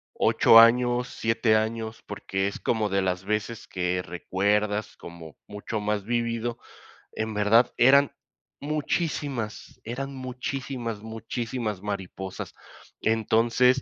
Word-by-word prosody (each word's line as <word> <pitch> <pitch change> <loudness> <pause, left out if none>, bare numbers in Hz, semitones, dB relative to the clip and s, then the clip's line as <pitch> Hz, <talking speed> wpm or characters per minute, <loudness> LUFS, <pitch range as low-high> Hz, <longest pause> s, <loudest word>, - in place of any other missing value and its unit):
8 115 - +6
años, 120 +1 +4
7 115 0 +1
años, 110 +1 -2
porque 95 -1 -2
es 100 - -5
como 110 -2 0
de 95 0 +1
las 90 0 -1
veces 105 +2 -3
que 90 -1 -1
recuerdas, 105 +4 -1
como 85 -3 -11
mucho 105 +1 -5
más 105 -1 -2
vívido, 120 0 -1 0.6
en 110 0 -3
verdad, 110 +4 +4
eran 140 +3 +6 0.5
muchísimas 145 -5 -3
eran 135 +4 -5
muchísimas, 130 -3 -5
muchísimas 110 -1 -4
mariposas, 95 -2 -5 0.5
entonces, 115 +4 +3
110 Hz, 110 wpm, -26 LUFS, 105-120 Hz, 0.6 s, 8